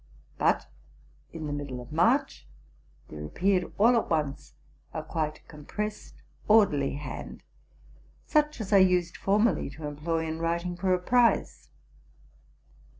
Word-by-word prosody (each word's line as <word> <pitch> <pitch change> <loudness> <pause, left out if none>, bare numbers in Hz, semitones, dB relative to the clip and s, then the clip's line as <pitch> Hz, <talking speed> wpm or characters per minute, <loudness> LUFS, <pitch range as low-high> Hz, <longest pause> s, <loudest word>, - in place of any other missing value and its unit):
But, - - +2 0.7
in 160 -2 -6
the 145 - -3
middie 140 -3 -5
of 120 0 -11
March, 235 - +1 0.6
there 75 -1 -8
appeared 180 - 0
all 235 +4 +5
at 230 - 0
once 150 -4 -2 0.4
a - - -3
quite 155 -1 -3
compre 150 +7 -4
essed, 210 - -17 0.2
orderly 200 -12 +4
hand, 145 +1 -7 0.8
such 300 -2 +1
as 210 -2 -3
I - - +8
used 180 -2 +3
formerly 210 -1 +1
to 150 +2 -9
employ 160 +3 -2
in 160 0 -4
writing 170 +2 -1
for 185 +2 -1
a 185 - +4
prize. 240 +5 +2
170 Hz, 135 wpm, -28 LUFS, 150-210 Hz, 0.8 s, I